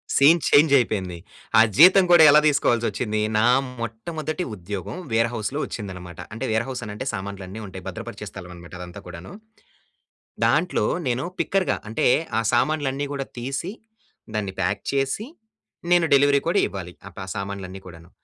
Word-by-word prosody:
Scene 155 +5 +6
change 145 0 +5
అయిపోయింది. 95 -7 -2 0.4
ఆ - - +9 0.2
జీతం 185 +3 +8
కూడా 175 -2 +8
ఎలా 150 +1 +7
తీసుకోవాల్సొచ్చింది? 115 -6 +1 0.2
నా 110 - +3 0.4
మొట్టమొదటి 155 - -4
ఉద్యోగం 95 - -6 0.2
వేర్ 115 +1 +2
హౌస్‌లో 120 +6 -3
వచ్చిందన్నమాట. 90 -5 -8
అంటే 115 +4 -4
వేర్ 110 +2 +1
హౌస్ 130 - -5
అని 105 - -6
అంటే 120 - -5
సామాన్లన్నీ 100 +1 -6
ఉంటాయి. 95 -1 -9
భద్రపరిచే - - -7
స్థలం 90 -2 -10
అన్నమాట 85 0 -13
అదంతా 90 -1 -9
కూడాను. 90 0 -9 1.1
దాంట్లో 150 +10 +2 0.2
నేను 125 +1 0 0.2
పిక్కర్‌గా 185 -4 0
అంటే 110 - +1 0.3
ఆ - - +1
సామాన్లన్నీ 145 +1 0
గూడా 135 -1 -4
తీసి 135 +9 -4 0.6
దాన్ని 100 -3 -2
ప్యాక్ 100 +1 -1
చేసి 140 - -1 0.6
నేను 175 -1 +5
డెలివరీ 140 0 +4
కూడా 180 +4 +2
ఇవ్వాలి. 90 -3 -7
ఆ! - - -8
ప - - -6 0.2
సామాన్లన్నీ 100 -1 -6
కూడాను. 85 -1 -13
115 Hz, 150 wpm, -23 LUFS, 95-145 Hz, 1.1 s, ఆ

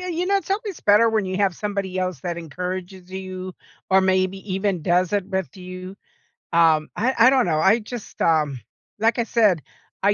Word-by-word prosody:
yeah, 365 - -5
you 350 +1 -1
know, 395 +1 +2
it's 385 -1 -4
always 400 -2 -2
better 210 +3 +5
when 215 -3 0
you 185 0 -3
have 195 -3 +1
somebody 200 -2 -3
else 185 -6 -2
that 175 +1 -4
encourages 180 +3 -6
you 185 -1 -6 0.4
or 190 0 +6
maybe 190 0 +1 0.2
even 195 -3 0
does 180 +3 +2
it 200 -2 0
with 190 -1 -3
you. 185 +1 -8 0.6
Um, 160 -2 +4
I 250 +5 +1
I 230 +2 +7
don't 260 -1 +3
know, 160 -3 +1
I 195 +7 +4
just, 225 0 -9
um, 150 -5 +2 0.4
like 225 +3 +1
I - - +3
said, 210 -10 +3 0.4
I 200 +1 +4
190 Hz, 195 wpm, -23 LUFS, 180-215 Hz, 0.6 s, I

